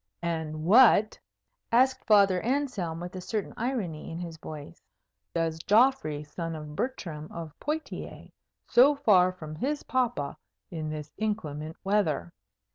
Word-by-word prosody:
"And 160 Hz, -2 st, -3 dB
what," 215 Hz, +1 st, +6 dB, 0.5 s
asked 260 Hz, +2 st, +3 dB
Father 200 Hz, -4 st, +5 dB
Anselm, 235 Hz, -, -1 dB
with 175 Hz, +2 st, -7 dB
a 185 Hz, -, -5 dB
certain 210 Hz, +2 st, -3 dB
irony 220 Hz, -, -3 dB
in 165 Hz, -, -6 dB
his 170 Hz, -2 st, -6 dB
voice, 155 Hz, +1 st, -9 dB, 0.5 s
"does 165 Hz, -1 st, 0 dB
Geoffrey, 210 Hz, -, +3 dB
son 165 Hz, +2 st, -5 dB
of 150 Hz, -1 st, -8 dB
Bertram 165 Hz, -, -4 dB
of 165 Hz, -3 st, -7 dB
Poictiers, 310 Hz, +1 st, -5 dB, 0.3 s
so 275 Hz, +4 st, +6 dB
far 200 Hz, -10 st, +5 dB
away 185 Hz, 0 st, -5 dB
from 155 Hz, -3 st, -7 dB
his 285 Hz, -, -2 dB
papa 245 Hz, -, -1 dB, 0.3 s
in 155 Hz, -2 st, -4 dB
this 150 Hz, -1 st, -6 dB
inclement 160 Hz, -8 st, -3 dB
weather?" 185 Hz, -, 0 dB
180 Hz, 135 wpm, -28 LUFS, 155-230 Hz, 0.5 s, what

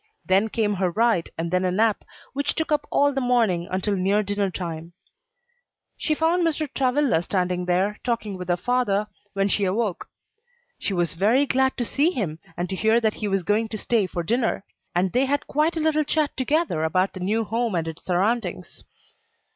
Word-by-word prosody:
Then 195 Hz, +3 st, +3 dB
came 215 Hz, -2 st, 0 dB
her 185 Hz, -, +3 dB
ride, 220 Hz, -2 st, +1 dB
and 165 Hz, +1 st, -3 dB
then 180 Hz, 0 st, +1 dB
a 185 Hz, -, +2 dB
nap, 215 Hz, +3 st, +1 dB, 0.3 s
which 280 Hz, +1 st, -1 dB
took 320 Hz, -1 st, -2 dB
up 295 Hz, -1 st, +1 dB
all 285 Hz, 0 st, +3 dB
the 270 Hz, -, -1 dB
morning 225 Hz, -9 st, +2 dB
until 190 Hz, +2 st, -1 dB
near 195 Hz, +3 st, +2 dB
dinner 205 Hz, 0 st, -1 dB
time. 170 Hz, -2 st, -6 dB, 1.0 s
She 310 Hz, -, -1 dB
found 330 Hz, +3 st, +2 dB
Mr. 315 Hz, -2 st, 0 dB
Travilla 260 Hz, -, +2 dB
sitting 180 Hz, -1 st, -1 dB
there, 190 Hz, +4 st, +1 dB
talking 230 Hz, -4 st, -2 dB
with 180 Hz, -1 st, -7 dB
her 175 Hz, -, +2 dB
father, 210 Hz, 0 st, +1 dB, 0.3 s
when 195 Hz, 0 st, +1 dB
she 205 Hz, 0 st, 0 dB
awoke. 195 Hz, 0 st, -1 dB, 0.7 s
She -, -, -2 dB
was 175 Hz, -2 st, 0 dB
very 220 Hz, +11 st, +3 dB
glad 265 Hz, -1 st, +1 dB
to 240 Hz, -, -1 dB
see 285 Hz, +7 st, +2 dB
him, 190 Hz, -, -3 dB, 0.2 s
and 175 Hz, -, -1 dB
to 190 Hz, -, -2 dB
hear 220 Hz, +4 st, +3 dB
that 220 Hz, -2 st, +1 dB
he 210 Hz, -, -4 dB
was 195 Hz, -2 st, 0 dB
going 210 Hz, +4 st, +1 dB
to 220 Hz, -, -5 dB
stay 215 Hz, -2 st, +1 dB
to 175 Hz, -1 st, -4 dB
dinner; 225 Hz, +1 st, 0 dB, 0.3 s
and 180 Hz, +1 st, +2 dB
they 255 Hz, +2 st, +2 dB
had 285 Hz, +2 st, 0 dB
quite 310 Hz, +3 st, +1 dB
a -, -, 0 dB
little 310 Hz, -1 st, +2 dB
chat 300 Hz, 0 st, 0 dB
together 285 Hz, -, 0 dB
about 185 Hz, +4 st, +1 dB
the 185 Hz, -, -7 dB
new 210 Hz, +5 st, 0 dB
home 225 Hz, -1 st, -1 dB
and 165 Hz, -1 st, -1 dB
its 160 Hz, -1 st, -7 dB
surroundings. 185 Hz, -1 st, -1 dB
210 Hz, 195 wpm, -24 LUFS, 185-255 Hz, 1.0 s, Then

